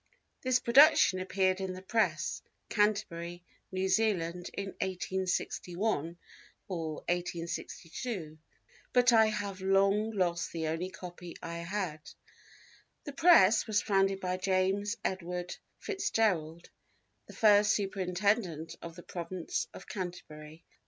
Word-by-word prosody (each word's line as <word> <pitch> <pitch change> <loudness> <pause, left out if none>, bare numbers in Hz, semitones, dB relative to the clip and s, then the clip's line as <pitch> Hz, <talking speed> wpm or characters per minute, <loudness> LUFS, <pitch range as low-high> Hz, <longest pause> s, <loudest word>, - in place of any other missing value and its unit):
This 255 -1 +3
production 260 -6 +6
appeared 185 0 +1
in 190 -1 -3
the 185 - -8
Press, 225 +3 0 0.3
Canterbury, 180 -5 0 0.3
New 190 0 -1
Zealand, 180 -4 0
in 200 0 -3
1861 185 -1 -2 0.5
or 165 -4 -3
1862, 170 +1 -4 0.5
but 250 -1 +5
I 220 -1 +6
have 205 -3 -3
long 195 +3 +3
lost 175 -5 -1
the 165 -1 -3
only 165 +3 -2
copy 175 -1 -9
I 170 0 -5
had." 170 -2 -3 1.0
The 285 - -7
Press 315 - +6
was 210 -2 +1
founded 195 -2 +2
by 185 -1 -2
James 190 +3 0
Edward 180 -1 -3 0.2
FitzGerald, 180 - -1 0.6
the - - -12
first 210 -1 +5
Superintendent 190 -3 -1
of 165 -1 -8
the 175 - -11
Province 175 0 -4
of - - -11
Canterbury. 165 -4 -7
185 Hz, 110 wpm, -31 LUFS, 175-205 Hz, 1.0 s, production